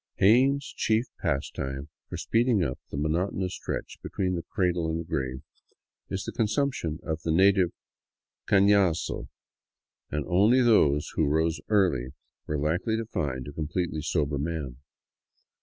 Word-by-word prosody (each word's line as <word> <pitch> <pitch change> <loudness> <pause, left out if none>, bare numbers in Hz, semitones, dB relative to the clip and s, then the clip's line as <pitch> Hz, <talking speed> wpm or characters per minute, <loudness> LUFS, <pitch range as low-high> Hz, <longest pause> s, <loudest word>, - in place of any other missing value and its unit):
Jaen's 135 +7 +4
chief 110 +2 +1
pastime 70 +1 -3 0.2
for - - -5
speeding 115 -4 +2
up 65 -5 -3
the - - -5
monotonous 90 +5 -1
stretch - - -5
between 95 -1 -2
the 85 - -2
cradle 90 -4 0
and 80 +1 -1
the - - -4
grave 65 -4 -3 0.7
is 95 0 -3
the - - -5
consumption 110 - -1
of 80 0 -3
the 80 - -1
native 95 +1 +4 0.4
" - - -65
cafiazo," 100 -4 +3 0.8
and 75 -1 -2
only 105 +8 +4
those 75 -11 +3
who 80 - +1
rose 80 +2 +1
early 80 - +2 0.3
were 75 - -1
likely 85 +10 0
to 115 - -3
find 65 - -3
a 70 - -7
completely 80 +1 -2
sober 75 -2 0
man. 75 -5 -3
85 Hz, 140 wpm, -27 LUFS, 75-100 Hz, 0.8 s, Jaen's